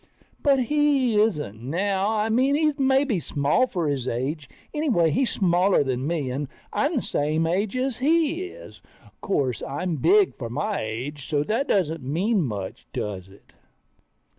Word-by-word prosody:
But 275 -3 +3
he 275 -5 +2
isn't 150 - -1
now, 190 - 0
I 220 0 0
mean 260 +5 +3
he's 305 -1 +1
maybe 265 -5 +2
small 150 - +1
for 175 -9 -2
his 135 -3 -2
age, 135 +4 -3 0.2
anyway 235 - +2
he's 250 - +1
smaller 180 -2 +3
than 130 0 -2
me, 155 -6 -1
and 140 +3 -3 0.3
I'm 295 +4 +1
the 255 - +1
same 155 +3 0
age 195 +8 0
as 255 -1 -1
he 330 +5 +1
is. 435 +7 -12 0.4
'Course, 135 -10 -1
I'm 160 +4 -3
big 400 - +4
for 120 -4 -6
my 205 - -2
age, 130 +7 -5
so 145 -1 +1
that 225 - -1
doesn't 165 -5 +1
mean 185 - +1
much, 105 - -5
does 95 -3 -4
it? 100 - -20
185 Hz, 160 wpm, -24 LUFS, -, 0.4 s, big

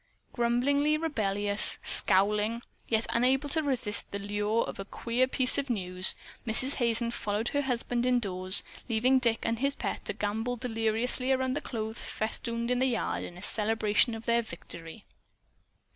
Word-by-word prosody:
Grumbling, 245 +4 +1 0.2
rebellious, 205 -9 +3
scowling, 210 +4 +4 0.2
yet 220 0 +1
unable 260 +4 +1
to 315 +3 0
resist 255 -8 0
the 200 - -4
lure 205 +2 -1
of - - -8
a - - -3
"queer 240 +5 -1
piece 260 0 +1
of 280 -1 -3
news," 185 -4 +1 0.3
Mrs. 255 +4 +6
Hazen 235 -1 +1
followed 210 0 -2
her 285 - 0
husband 245 -2 -2
indoors, 190 -6 +2 0.3
leaving 250 +4 +3
Dick 235 -3 0
and 230 0 -1
his 280 +2 0
pet - - -4
to - - -3
gambol 220 +4 -3
deliriously 240 +2 -1
around 260 -1 0
the 290 - -3
clothes 220 -2 -6
festooned 235 +2 -4
yard 250 -3 -1
in 175 - -9
celebration 220 +1 +1
of 225 0 -10
their 235 0 +2
victory. 170 -2 -10
230 Hz, 145 wpm, -28 LUFS, 210-250 Hz, 0.3 s, Mrs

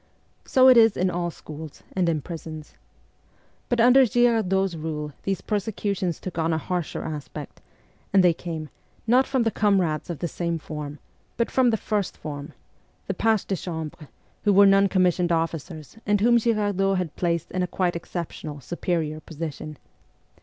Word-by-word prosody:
So 260 0 +5
it 255 -2 +8
is 225 -2 +6
in 185 0 +1
all 175 0 -1
schools 155 -2 -10
and 180 -3 +2
in 155 -4 -1
prisons. 160 -3 -8 1.0
But 245 - +1
under 250 +3 +7
Girardot's 215 -6 +2
rule 150 -2 -4
these 195 -3 -1
persecutions 200 -4 -2
took 180 -3 -6
on 165 +1 +1
a 160 - +1
harsher 175 +1 -3
aspect, 150 -2 -7 0.5
and 195 -2 +5
they 175 -2 +5
came, 160 -2 -6 0.4
not 250 +4 +4
from 265 -3 +1
the 225 - +1
comrades 185 -9 +1
of 170 - -3
the 170 - -2
same 170 0 -2
form, 150 -2 -6 0.4
but 235 - 0
from 255 -2 +4
the 220 - +2
first 205 -2 -2
form 145 0 -7 0.5
the 195 - -2
pages 220 +2 +1
de 195 - -1
chambre, 160 -4 -6 0.4
who 205 - +4
were 200 +1 +7
non 195 0 +5
commissioned 180 -2 +2
officers, 165 +2 -3
and 205 0 +3
whom 235 +3 +5
Girardot 205 -4 +1
had 180 -4 -3
placed 170 -2 -1
in 185 - -1
a 180 - 0
quite 175 -1 0
exceptional, 165 -3 -6
superior 160 +1 -2
position. 155 -1 -7
180 Hz, 165 wpm, -25 LUFS, 160-205 Hz, 1.0 s, it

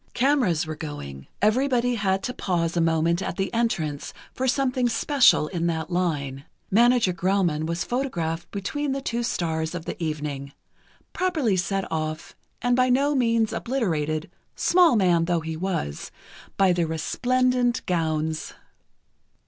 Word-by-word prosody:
Cameras 245 - +2
were 155 0 -5
going, 70 - -7 0.2
everybody 245 +2 +2
had 195 -4 0
to 250 - -3
pause 175 -7 -1
a 170 - +2
moment 165 +1 +2
at 185 - -4
the 195 -1 -2
entrance 160 -11 -1 0.2
for 260 - -2
something 255 -1 +1
special 265 - +4
in 170 -2 -1
that 165 +1 -2
line. 145 -6 -1 0.3
Manager 235 -2 +4
Grauman 175 -3 0
was 170 +1 -2
photographed 175 -11 -2
between 270 +8 -2
the 275 - -3
two 235 -2 -1
stars 160 -6 -2
of 165 -2 -6
the - - -6
evening, 150 -3 -4 0.6
properly 320 - +1
set 195 +1 -1
off 155 0 -4 0.3
and 245 0 +3
by 255 0 +3
no 280 +4 +3
means 230 -4 +2
obliterated, 160 - -1 0.2
small 350 -5 +4
man 175 -5 +3
though 170 -1 0
he 160 0 -4
was, 165 - -3 0.5
by 190 -2 +4
the 170 -2 0
resplendent 245 +9 0
gowns. 160 -2 -1
180 Hz, 140 wpm, -25 LUFS, 160-245 Hz, 0.6 s, special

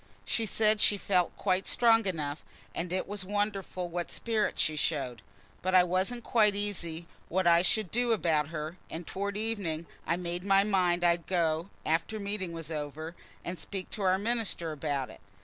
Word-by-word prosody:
She 225 -2 0
said 215 0 +3
she 205 - +5
felt 185 -3 +1
quite 185 -1 +1
strong 225 -3 +4
enough; 150 -5 -3 0.3
and 175 +1 -3
it 185 0 -1
was 205 -1 -3
wonderful 195 -2 -2
what 175 0 -3
spirit 225 -2 0
she 155 - +1
showed. 135 -7 -1 0.4
But 185 +1 +1
I 180 - +8
wasn't 190 +7 0
quite 215 -4 +4
easy 175 -5 -2 0.2
what 185 +1 +1
I 170 0 +6
should 195 0 +1
do 240 +1 +2
about 160 -9 +2
her, 155 +2 -5
and 165 +1 -6
towards 200 +3 -3
evening 200 -8 -2 0.2
I 170 - +2
made 175 0 -3
up 195 - -9
my 195 0 +6
mind 180 -4 +2
I'd 170 -1 +2
go, 170 -1 +1 0.2
after 165 +7 0
Meeting 200 -3 -3
was 165 -1 -6
over, 155 +2 -5 0.3
and 175 0 -4
speak 195 -2 -6
to 210 - -4
our 185 -1 +3
minister 210 -6 -1
about 145 -3 -2
it. - - -15
185 Hz, 185 wpm, -30 LUFS, 165-205 Hz, 0.4 s, I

